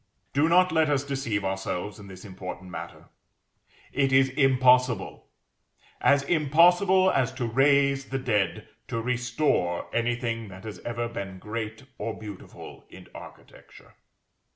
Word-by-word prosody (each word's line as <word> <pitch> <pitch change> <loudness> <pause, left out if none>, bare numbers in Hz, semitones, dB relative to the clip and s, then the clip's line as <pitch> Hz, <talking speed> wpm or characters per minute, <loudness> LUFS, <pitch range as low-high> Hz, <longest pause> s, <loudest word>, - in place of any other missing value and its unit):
Do 145 +4 +3
not 180 +2 +4
let 160 -1 +2
us 140 -2 +1
deceive 135 -8 -2
ourselves 95 +1 -3
in 100 - -11
this 95 0 -11
important 95 -1 -8
matter; - - -9 0.8
it 135 -1 +1
is 135 0 +4
impossible, 130 -2 +2 0.7
as 140 -1 +4
impossible 175 +5 +4
as 130 -1 +1
to 130 -2 -3
raise 140 +3 +3
the 135 - -3
dead, 105 -8 -1 0.2
to 115 - -3
restore 120 - 0
anything 120 -1 -1
that 95 0 -12
has 110 -2 -8
ever 120 0 -3
been 100 -5 -6
great 110 +3 -6 0.2
or 110 +1 -4
beautiful 105 -3 -10
in - - -14
architecture. - - -14
125 Hz, 130 wpm, -26 LUFS, 105-140 Hz, 0.8 s, not